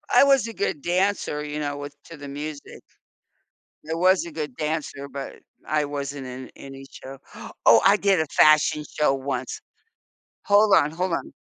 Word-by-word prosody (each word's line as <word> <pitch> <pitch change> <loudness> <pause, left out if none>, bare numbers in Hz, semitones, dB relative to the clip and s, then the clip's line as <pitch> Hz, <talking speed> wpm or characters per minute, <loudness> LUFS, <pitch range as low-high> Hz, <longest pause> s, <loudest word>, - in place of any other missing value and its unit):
I - - +8
was 275 -4 +3
a 230 - -7
good 150 -8 -2
dancer, 180 -4 -1
you 150 0 -5
know, 145 -1 -3
with 145 0 -8
to 165 - -11
the 145 0 -9
music. 145 +1 -8 1.1
I 160 - -1
was 185 +1 +3
a 170 - -8
good 150 -5 -5
dancer, 150 -2 -4
but 140 0 -7 0.3
I 150 -1 0
wasn't 140 -2 -5
in 130 +1 -8
any 135 0 -11
show. 135 +1 -10 0.5
Oh, 115 -1 +7
I 200 - +6
did 195 -4 +2
a 160 - +1
fashion 155 0 +4
show 150 -2 +3
once! 130 -1 -4 0.8
Hold 205 0 +5
on, 150 -2 +3
hold 180 +1 -2
on. - - -4
150 Hz, 170 wpm, -24 LUFS, 140-175 Hz, 1.1 s, I